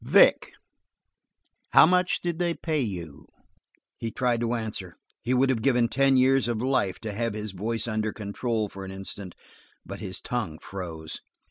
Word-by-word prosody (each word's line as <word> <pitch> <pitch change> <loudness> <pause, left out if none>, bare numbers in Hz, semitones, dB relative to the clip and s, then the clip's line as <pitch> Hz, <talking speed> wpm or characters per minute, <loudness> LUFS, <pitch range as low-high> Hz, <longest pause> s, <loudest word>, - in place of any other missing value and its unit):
"Vic, - - +5 1.2
how - - +9
much 180 +1 +2
did 175 -1 -2
they 170 -1 +1
pay 155 -3 -1
you?" 90 - -5 0.7
He 115 - -3
tried 120 0 0
to 120 0 0
answer; 105 -6 -4 0.3
he 120 - -2
would 130 +1 +4
have 115 -4 -1
given 120 -1 +3
ten 135 +2 +3
years 130 0 +4
of 120 -2 -1
life 125 -6 +1
to 110 -2 -4
have 115 0 -2
his 105 -1 -4
voice 110 +4 -2
under 110 -1 -1
control 110 +1 -2
for 95 -1 -9
an 95 - -7
instant; 95 -1 -6 0.5
but - - -7
his 95 - -3
tongue 110 -11 -3
froze. 80 -5 -6
115 Hz, 165 wpm, -27 LUFS, 100-130 Hz, 1.2 s, how